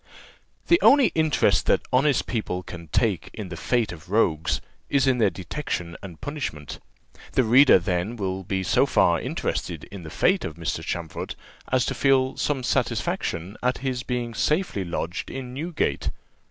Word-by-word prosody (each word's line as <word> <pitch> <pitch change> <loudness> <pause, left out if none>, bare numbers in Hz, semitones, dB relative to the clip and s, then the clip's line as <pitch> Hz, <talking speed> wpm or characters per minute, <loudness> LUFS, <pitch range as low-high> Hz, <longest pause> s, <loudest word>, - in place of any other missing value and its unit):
The 345 - +4
only 275 -2 +6
interest 155 -2 +2
that - - +3
honest 135 +1 +3
people 100 -6 -3
can 85 -2 -9
take 95 - 0
in 105 -4 -6
the 90 - -6
fate 115 +6 0
of 85 0 -11
rogues 85 -7 +2 0.3
is 140 -1 +3
in 130 -2 +2
their 110 - +4
detection 90 - -4
and 90 -5 -10
punishment; 135 - -5 0.5
the 130 - +4
reader, 125 +3 +7
then, 90 +4 -1
will 95 -3 -3
be 95 +1 -2
so - - +3
far - - +3
interested - - -3
in 100 -2 -8
the 80 - -8
fate 185 - +2
of 75 - -5
Mr. 85 -1 -3
Champfort, 85 -2 -4 0.4
as 130 -2 +3
to - - -1
feel 135 -1 +2
some 140 -3 -1
satisfaction 95 -5 -1
at 125 +1 +1
his 130 -2 -1
being 120 -2 -3
safely 150 - 0
lodged 85 0 -4
in 130 -2 -6
Newgate. 160 +5 -1
115 Hz, 165 wpm, -25 LUFS, 90-135 Hz, 0.5 s, reader